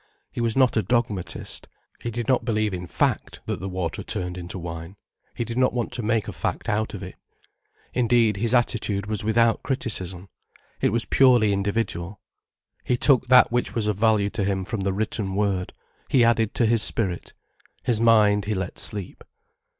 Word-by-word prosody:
He -, -, -4 dB
was 115 Hz, 0 st, 0 dB
not 130 Hz, -2 st, +4 dB
a 110 Hz, -, +3 dB
dogmatist. 105 Hz, -5 st, -2 dB, 0.3 s
He 120 Hz, -, -3 dB
did 115 Hz, -1 st, -4 dB
not 130 Hz, -, +2 dB
believe 110 Hz, -3 st, 0 dB
in 90 Hz, -1 st, -5 dB
fact -, -, -1 dB
that -, -, -3 dB
the 95 Hz, -, -5 dB
water 90 Hz, -3 st, -3 dB
turned 90 Hz, 0 st, -4 dB
into 90 Hz, +1 st, -7 dB
wine. 85 Hz, +1 st, -7 dB, 0.4 s
He 120 Hz, -, -2 dB
did 115 Hz, +2 st, -3 dB
not 130 Hz, -, +3 dB
want 120 Hz, -2 st, -2 dB
to 120 Hz, -, -3 dB
make 110 Hz, 0 st, 0 dB
a -, -, -5 dB
fact -, -, -3 dB
out 110 Hz, +1 st, -1 dB
of -, -, -7 dB
it. -, -, -8 dB, 0.8 s
Indeed, 115 Hz, -4 st, +2 dB
his 115 Hz, +4 st, +1 dB
attitude 110 Hz, -5 st, 0 dB
was 105 Hz, -1 st, -3 dB
without 115 Hz, +1 st, +2 dB
criticism. 95 Hz, -8 st, -3 dB, 0.5 s
It -, -, +3 dB
was 115 Hz, -1 st, 0 dB
purely 120 Hz, -6 st, +4 dB
individual. 100 Hz, -2 st, -2 dB, 0.6 s
He 125 Hz, -, 0 dB
took 130 Hz, -1 st, +3 dB
that 125 Hz, -1 st, +6 dB
which 120 Hz, +1 st, -1 dB
was 115 Hz, -3 st, 0 dB
of 105 Hz, -1 st, 0 dB
value 105 Hz, -2 st, +2 dB
to 110 Hz, -2 st, -2 dB
him 95 Hz, -1 st, -1 dB
from 110 Hz, +2 st, -4 dB
the 95 Hz, 0 st, 0 dB
Written 100 Hz, -1 st, -2 dB
Word, 100 Hz, -3 st, 0 dB, 0.4 s
he 125 Hz, -, +4 dB
added 115 Hz, -2 st, +2 dB
to 120 Hz, -, +3 dB
his 115 Hz, 0 st, +3 dB
spirit. 100 Hz, -5 st, 0 dB, 0.5 s
His 115 Hz, -2 st, 0 dB
mind 105 Hz, -3 st, +4 dB
he 105 Hz, +1 st, -1 dB
let 95 Hz, -2 st, -4 dB
sleep. 100 Hz, -4 st, -1 dB
110 Hz, 185 wpm, -24 LUFS, 95-115 Hz, 0.8 s, that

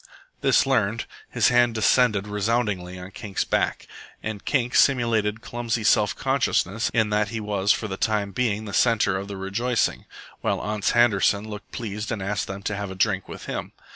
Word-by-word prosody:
This -, -, +4 dB
learned, -, -, +1 dB, 0.2 s
his -, -, +3 dB
hand 120 Hz, -1 st, +3 dB
descended 110 Hz, -2 st, +3 dB
resoundingly 105 Hz, -3 st, -1 dB
on 90 Hz, +1 st, -9 dB
Kink's 100 Hz, -2 st, -3 dB
back, -, -, -1 dB, 0.4 s
and 110 Hz, -2 st, -5 dB
Kink 125 Hz, -4 st, 0 dB
simulated 115 Hz, -5 st, +3 dB
clumsy 120 Hz, -1 st, -3 dB
self 105 Hz, 0 st, +3 dB
consciousness 115 Hz, -5 st, 0 dB
in 110 Hz, -2 st, +1 dB
that 105 Hz, 0 st, +2 dB
he 115 Hz, 0 st, -4 dB
was 105 Hz, -1 st, +1 dB
for 110 Hz, -, 0 dB
the 95 Hz, -1 st, -5 dB
time 105 Hz, -2 st, 0 dB
being 110 Hz, 0 st, -1 dB
the 100 Hz, -, -7 dB
centre 110 Hz, -5 st, +3 dB
of 95 Hz, +1 st, -4 dB
the 100 Hz, -1 st, -6 dB
rejoicing, 110 Hz, +6 st, -1 dB, 0.3 s
while -, -, -1 dB
Ans 105 Hz, -1 st, -1 dB
Handerson 105 Hz, -3 st, +3 dB
looked 105 Hz, -1 st, -9 dB
pleased 105 Hz, -2 st, -5 dB
and 110 Hz, -, -2 dB
asked 100 Hz, +1 st, -2 dB
them 95 Hz, +1 st, -6 dB
to 105 Hz, -, -2 dB
have 100 Hz, -1 st, -4 dB
a 95 Hz, -, -7 dB
drink 95 Hz, 0 st, 0 dB
with -, -, -8 dB
him. -, -, -5 dB
105 Hz, 180 wpm, -24 LUFS, 100-115 Hz, 0.4 s, This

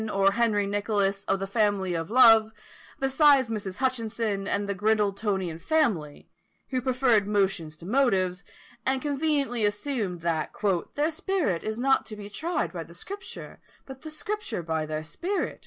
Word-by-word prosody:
or 195 Hz, -1 st, +3 dB
Henry 215 Hz, -2 st, +1 dB
Nicholas, 200 Hz, -1 st, 0 dB
of 195 Hz, -, 0 dB
the 195 Hz, -, -2 dB
Family 200 Hz, -3 st, +1 dB
of 165 Hz, -1 st, -3 dB
Love, 225 Hz, -2 st, +6 dB, 0.5 s
besides 270 Hz, -2 st, +4 dB
Mrs. 205 Hz, -3 st, -4 dB
Hutchinson, 230 Hz, -6 st, -1 dB
and 200 Hz, 0 st, -1 dB
the 200 Hz, -, -1 dB
Grindletonian 200 Hz, -4 st, 0 dB
family, 210 Hz, -, 0 dB, 0.4 s
who 255 Hz, -1 st, 0 dB
preferred 250 Hz, -5 st, +2 dB
"motions 195 Hz, -6 st, 0 dB
to 165 Hz, -, -12 dB
motives," 195 Hz, -6 st, +1 dB, 0.4 s
and 265 Hz, 0 st, +1 dB
conveniently 280 Hz, -4 st, 0 dB
assumed 205 Hz, -4 st, -1 dB
that 165 Hz, -2 st, -1 dB, 0.4 s
"their 300 Hz, +3 st, +1 dB
spirit 315 Hz, -, -1 dB
is 220 Hz, 0 st, -3 dB
not 265 Hz, +2 st, +2 dB
to 215 Hz, -, -7 dB
be 205 Hz, 0 st, -9 dB
tried 335 Hz, -, -2 dB
by 170 Hz, -2 st, -4 dB
the 170 Hz, +1 st, -15 dB
Scripture, 390 Hz, -, -8 dB, 0.3 s
but 265 Hz, -1 st, -10 dB
the 315 Hz, -, -7 dB
Scripture 310 Hz, -, -4 dB
by 160 Hz, -1 st, -2 dB
their 155 Hz, 0 st, -3 dB
spirit." 365 Hz, -, -3 dB
210 Hz, 155 wpm, -27 LUFS, 195-265 Hz, 0.5 s, Love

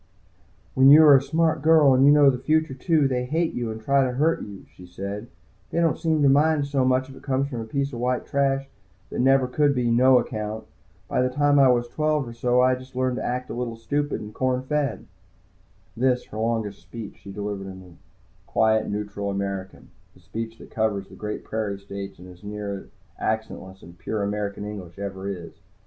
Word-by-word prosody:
"When 130 Hz, +1 st, +6 dB
you 155 Hz, +3 st, +9 dB
are 145 Hz, -2 st, +8 dB
a 135 Hz, -, +5 dB
smart 160 Hz, +2 st, +1 dB
girl, 155 Hz, -3 st, +6 dB
and 130 Hz, +1 st, +4 dB
you 140 Hz, -, +7 dB
know 145 Hz, -2 st, +6 dB
the 125 Hz, -, -4 dB
future, 155 Hz, +2 st, +1 dB
too, 150 Hz, +2 st, +2 dB
they 125 Hz, -2 st, -1 dB
hate 160 Hz, +5 st, -1 dB
you 120 Hz, -2 st, -3 dB
and 110 Hz, 0 st, -5 dB
try 140 Hz, +4 st, +2 dB
to 125 Hz, -1 st, -1 dB
hurt 155 Hz, +6 st, +1 dB
you," 100 Hz, -2 st, -9 dB
she 90 Hz, -, -13 dB
said. 100 Hz, +5 st, -6 dB, 0.4 s
"They -, -, -1 dB
don't 165 Hz, -2 st, +1 dB
seem 160 Hz, -3 st, +1 dB
to -, -, +6 dB
mind 150 Hz, +2 st, +4 dB
it -, -, -4 dB
so 140 Hz, -2 st, +1 dB
much 130 Hz, 0 st, +2 dB
if 135 Hz, -, -12 dB
it -, -, -13 dB
comes 135 Hz, 0 st, -1 dB
from 120 Hz, -5 st, -4 dB
a -, -, -5 dB
piece 140 Hz, +4 st, -2 dB
of 120 Hz, -, -5 dB
white 125 Hz, +1 st, -1 dB
trash 135 Hz, -1 st, 0 dB, 0.4 s
that -, -, -4 dB
never 135 Hz, 0 st, +4 dB
could 145 Hz, +2 st, +2 dB
be 120 Hz, -2 st, +1 dB
'no 130 Hz, +2 st, +5 dB
account.' 110 Hz, -2 st, -3 dB, 0.4 s
By -, -, 0 dB
the 125 Hz, -, +2 dB
time 145 Hz, +2 st, +3 dB
I 135 Hz, -, +7 dB
was 120 Hz, -1 st, +2 dB
twelve 150 Hz, 0 st, 0 dB
or 120 Hz, -, -7 dB
so 125 Hz, +1 st, +2 dB
I 130 Hz, -, +5 dB
had 130 Hz, 0 st, -8 dB
learned 130 Hz, -1 st, 0 dB
to -, -, -3 dB
act 125 Hz, +1 st, -3 dB
just -, -, -4 dB
a 120 Hz, -, -5 dB
little 120 Hz, -2 st, -3 dB
stupid 145 Hz, +6 st, -2 dB
and 105 Hz, 0 st, -9 dB
corn 130 Hz, +1 st, 0 dB
fed." 145 Hz, -2 st, -2 dB, 0.9 s
This, 125 Hz, +1 st, +1 dB
her 110 Hz, -, -7 dB
longest 110 Hz, -3 st, -2 dB
speech, 115 Hz, -3 st, -9 dB
she 100 Hz, -, -10 dB
delivered 100 Hz, -1 st, -5 dB
in 95 Hz, -2 st, -12 dB, 0.5 s
quiet, 110 Hz, 0 st, +2 dB
Neutral 100 Hz, -1 st, -4 dB
American, 100 Hz, -1 st, -5 dB, 0.3 s
the -, -, -19 dB
speech 115 Hz, 0 st, -6 dB
that -, -, -14 dB
covers 105 Hz, -3 st, -1 dB
the -, -, -13 dB
great 105 Hz, 0 st, -5 dB
prairie 110 Hz, -3 st, -3 dB
states 100 Hz, 0 st, -8 dB
and 90 Hz, -, -12 dB
is 90 Hz, -1 st, -14 dB
as -, -, -24 dB
near 100 Hz, -1 st, -6 dB, 0.3 s
accentless 105 Hz, -3 st, -4 dB
and 85 Hz, 0 st, -14 dB
pure 105 Hz, +5 st, -3 dB
as -, -, 0 dB
American 105 Hz, -1 st, -4 dB
English 100 Hz, -5 st, -8 dB
ever 100 Hz, -1 st, -5 dB
is. 90 Hz, -4 st, -8 dB
125 Hz, 220 wpm, -24 LUFS, 105-140 Hz, 0.9 s, you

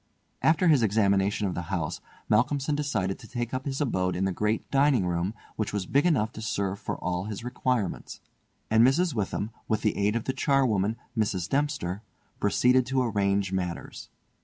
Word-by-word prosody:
After 160 Hz, +3 st, +3 dB
his 150 Hz, -6 st, +5 dB
examination 100 Hz, -1 st, +2 dB
of 95 Hz, -, -1 dB
the 90 Hz, -, -3 dB
house, 85 Hz, -5 st, -2 dB, 0.3 s
Malcolmson 140 Hz, +6 st, +2 dB
decided 110 Hz, -11 st, -1 dB
to -, -, -12 dB
take 120 Hz, -1 st, -4 dB
up 130 Hz, +1 st, -3 dB
his 135 Hz, -1 st, -2 dB
abode 95 Hz, -, 0 dB
in 95 Hz, +2 st, 0 dB
the 95 Hz, -, 0 dB
great 105 Hz, +4 st, -1 dB
dining 135 Hz, -7 st, +3 dB
room, 90 Hz, +4 st, -1 dB, 0.2 s
which 110 Hz, -, -1 dB
was 100 Hz, -3 st, -1 dB
big 140 Hz, -, +2 dB
enough 120 Hz, -10 st, +2 dB
to 110 Hz, -, -9 dB
serve 100 Hz, -3 st, -2 dB
for -, -, -4 dB
all 90 Hz, +1 st, -2 dB
his 105 Hz, 0 st, -6 dB
requirements; 125 Hz, -4 st, -2 dB, 0.5 s
and 110 Hz, +1 st, +6 dB
Mrs. 155 Hz, +6 st, +3 dB
Witham, 105 Hz, 0 st, -2 dB, 0.2 s
with 110 Hz, -1 st, 0 dB
the 105 Hz, -, +1 dB
aid 105 Hz, +2 st, +1 dB
of 115 Hz, -, -1 dB
the 130 Hz, -, -2 dB
charwoman, 115 Hz, -9 st, +2 dB, 0.2 s
Mrs. 100 Hz, -6 st, 0 dB
Dempster, 110 Hz, -9 st, -1 dB, 0.4 s
proceeded 125 Hz, +5 st, +3 dB
to 130 Hz, 0 st, +1 dB
arrange 100 Hz, -4 st, +1 dB
matters. 90 Hz, -2 st, -4 dB
110 Hz, 180 wpm, -27 LUFS, 95-130 Hz, 0.5 s, and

